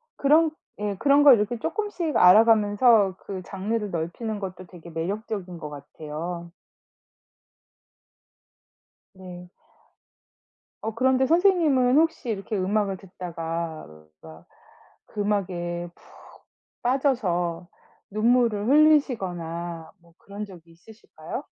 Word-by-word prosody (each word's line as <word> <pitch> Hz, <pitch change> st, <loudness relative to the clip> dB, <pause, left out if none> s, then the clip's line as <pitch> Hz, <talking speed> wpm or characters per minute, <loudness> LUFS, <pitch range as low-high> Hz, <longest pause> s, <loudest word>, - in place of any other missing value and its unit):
그런 310 Hz, +3 st, +3 dB, 0.3 s
예 205 Hz, -1 st, -2 dB
그런 285 Hz, +5 st, +4 dB
걸 280 Hz, -4 st, +9 dB
이렇게 220 Hz, +3 st, -1 dB
쪼끔씩 375 Hz, -, -3 dB
알아가면서 210 Hz, +1 st, +5 dB
그 190 Hz, -2 st, -7 dB
장르를 205 Hz, +3 st, -3 dB
넓히는 190 Hz, +6 st, -4 dB
것도 185 Hz, -2 st, -7 dB
되게 170 Hz, -1 st, -13 dB
매력적인 185 Hz, +2 st, -5 dB
것 155 Hz, -3 st, -7 dB
같아요. 155 Hz, +4 st, -7 dB, 2.6 s
네. 180 Hz, -1 st, -11 dB, 1.3 s
어 220 Hz, +1 st, -4 dB
그런데 260 Hz, +3 st, +2 dB
선생님은 315 Hz, -7 st, +3 dB
혹시 320 Hz, -5 st, +1 dB
이렇게 210 Hz, 0 st, -3 dB
음악을 195 Hz, 0 st, 0 dB
듣다가 170 Hz, -3 st, -6 dB, 1.2 s
그 210 Hz, -, -5 dB
음악에 175 Hz, -4 st, -2 dB
푹 -, -, -24 dB, 0.8 s
빠져서 185 Hz, -, 0 dB, 0.4 s
눈물을 225 Hz, -1 st, +2 dB
흘리시거나 175 Hz, -, +1 dB
뭐 170 Hz, -1 st, -24 dB
그런 205 Hz, +1 st, -8 dB
적이 170 Hz, -4 st, -15 dB
있으실까요? 210 Hz, +7 st, -10 dB
200 Hz, 230 characters per minute, -25 LUFS, 175-245 Hz, 2.6 s, 걸